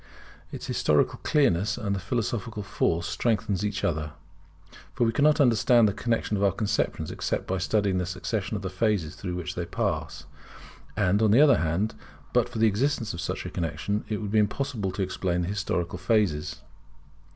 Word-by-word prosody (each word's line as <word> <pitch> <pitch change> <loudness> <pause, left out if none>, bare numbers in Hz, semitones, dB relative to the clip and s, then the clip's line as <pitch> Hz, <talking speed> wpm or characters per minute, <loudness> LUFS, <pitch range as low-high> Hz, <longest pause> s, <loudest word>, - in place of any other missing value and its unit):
Its - - -6
historical - - +1
clearness 105 - +2
and 100 -1 -1
its 95 - -5
philosophical 115 0 -2
force 85 -3 0
strengthen 110 +1 0
each 105 0 -2
other, 75 -2 -1 0.8
for 130 - +1
we 115 - +3
cannot 145 +5 +3
understand 120 -3 +5
the 100 - 0
connexion 115 -1 -1
of 100 - -1
our 100 - +4
conceptions 100 +2 -1
except - - -2
by 95 0 -2
studying 100 0 +1
the 90 - -1
succession 95 +3 -3
of 100 - -4
the 95 - -2
phases 95 -5 0
through 90 -3 -5
which 90 -3 -4
they - - -3
pass. - - -3 0.7
And 100 0 +2
on 110 - +4
the 110 +6 +5
other 140 -4 +6
hand, 85 +7 0 0.4
but - - +3
for - - -7
the 110 - +4
existence 115 +2 +1
of 85 - -5
such 90 - -3
a - - -5
connexion, 85 +5 -2
it 105 - -1
would 105 -2 -4
be 110 - +4
impossible 105 -1 -1
to 100 - -1
explain 90 -1 -1
the - - -3
historical 90 -3 -2
phases. 95 -6 0
100 Hz, 185 wpm, -27 LUFS, 90-115 Hz, 0.8 s, other